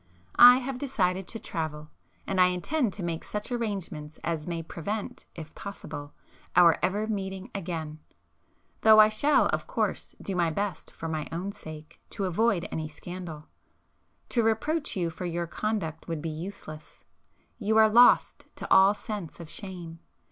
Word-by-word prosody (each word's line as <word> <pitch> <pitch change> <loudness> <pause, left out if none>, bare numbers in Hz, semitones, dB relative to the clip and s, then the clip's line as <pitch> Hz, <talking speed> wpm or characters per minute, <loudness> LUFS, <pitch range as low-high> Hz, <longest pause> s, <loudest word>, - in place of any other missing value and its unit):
I 245 +1 +11
have 260 0 -4
decided 190 -9 0
to - - -5
travel,—and 160 +2 -4
I 180 - +7
intend 205 - 0
to 200 - -5
make 170 -1 -3
such 210 +4 -5
arrangements 190 -10 -4
as 165 -2 -2
may 170 -1 -3
prevent, 200 +6 -5
if 160 -2 -9
possible, 150 -7 -8 0.4
our 175 -2 +6
ever 200 +4 0
meeting 195 -3 -4
again,—though 170 +5 -1
I 215 0 +8
shall 285 +8 +3
of - - -2
course - - -2
do 195 - -4
my 170 -2 +2
best 190 0 -3
for 165 - -7
my 155 -2 -3
own 180 +4 -3
sake, 155 -6 -11
to 200 - -3
avoid 190 0 +1
any 155 -1 -3
[p 150 - -15
383] - - -21
scandal. 175 -4 -8 0.8
To 235 - +2
reproach 285 +8 0
you 175 -3 -1
for 170 +3 -6
your 170 0 -2
conduct 170 -3 -3
would 165 -2 -3
be 165 - -2
useless; 155 -2 -9 0.6
you 220 0 +1
are 220 0 +8
lost 240 +3 +5
to - - -6
all 195 +2 +7
sense 205 -6 -6
of 165 -2 -9
shame. 175 -5 -7
185 Hz, 160 wpm, -28 LUFS, 165-215 Hz, 0.8 s, I